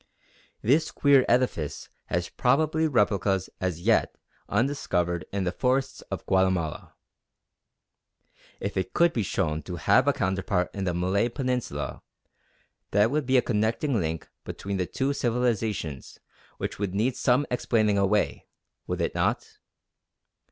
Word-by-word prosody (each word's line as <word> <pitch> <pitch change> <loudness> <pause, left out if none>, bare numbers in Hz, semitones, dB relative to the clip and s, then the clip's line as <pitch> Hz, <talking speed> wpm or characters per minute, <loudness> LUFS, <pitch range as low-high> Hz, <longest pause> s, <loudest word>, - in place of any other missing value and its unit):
This 145 +8 +3
queer 140 -2 +4
edifice 120 - 0 0.2
has 85 0 -1
probably 155 +5 +2
replicas 100 - +1
as 90 -3 -2
yet 110 +4 +2 0.3
undiscovered 90 - 0
in 100 -1 -1
the 90 - 0
forests 130 +6 0
of - - -5
Guatemala. 95 -4 0 1.6
If 100 0 -4
it 95 - -2
could 170 0 +4
be 115 - 0
shown 80 -5 -1
to - - -6
have - - +3
a - - +4
counterpart 95 -1 -1
in 100 -2 -3
the 90 -2 -1
Malay 95 +6 +1
Peninsula, 125 -1 -3 0.9
that 105 +3 +3
would 150 -2 -1
be 130 0 +4
a 125 - +4
connecting 115 +4 0
link 80 -2 -3 0.2
between 100 0 -4
the 90 -1 -1
two 135 +2 -1
civilisations 115 - -1 0.4
which - - -4
would 100 -2 -2
need 120 +5 +1
some 130 +3 +2
explaining 110 -4 +2
away, 100 +2 +1 0.4
would - - -2
it - - -1
not? - - -1
105 Hz, 135 wpm, -26 LUFS, 95-125 Hz, 1.6 s, queer